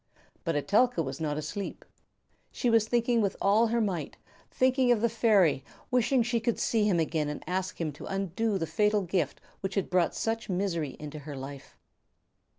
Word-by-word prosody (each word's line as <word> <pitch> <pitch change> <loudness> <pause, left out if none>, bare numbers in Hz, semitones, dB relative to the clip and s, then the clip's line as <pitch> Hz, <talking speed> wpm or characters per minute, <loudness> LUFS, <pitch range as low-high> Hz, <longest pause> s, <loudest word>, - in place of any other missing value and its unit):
But 165 - -1
Etelka 205 - +2
was 135 +1 -5
not 150 -2 -1
asleep. 190 +7 -5 0.7
She 245 - 0
was 225 -1 +4
thinking 235 0 +2
with 200 -2 0
all 210 +4 +4
her 235 +1 +1
might, 185 -9 -2 0.3
thinking 255 -1 +3
of 240 - +4
the 235 +2 +2
fairy, 205 - +3 0.3
wishing 250 0 +3
she 235 0 0
could 230 0 0
see 220 -2 +1
him 190 -5 +2
again 155 -2 0
and 150 - -6
ask 185 0 -3
him 160 -3 -1
to 145 - -10
undo 195 +2 -1
the 165 - -1
fatal 210 +6 +1
gift 175 -5 -1 0.2
which 190 0 -4
had 195 - -1
brought 180 -2 +2
such 225 -1 -2
misery 175 -6 -1
into 150 0 -7
her 145 0 -8
life. 135 +1 -9
195 Hz, 180 wpm, -29 LUFS, 160-225 Hz, 0.7 s, was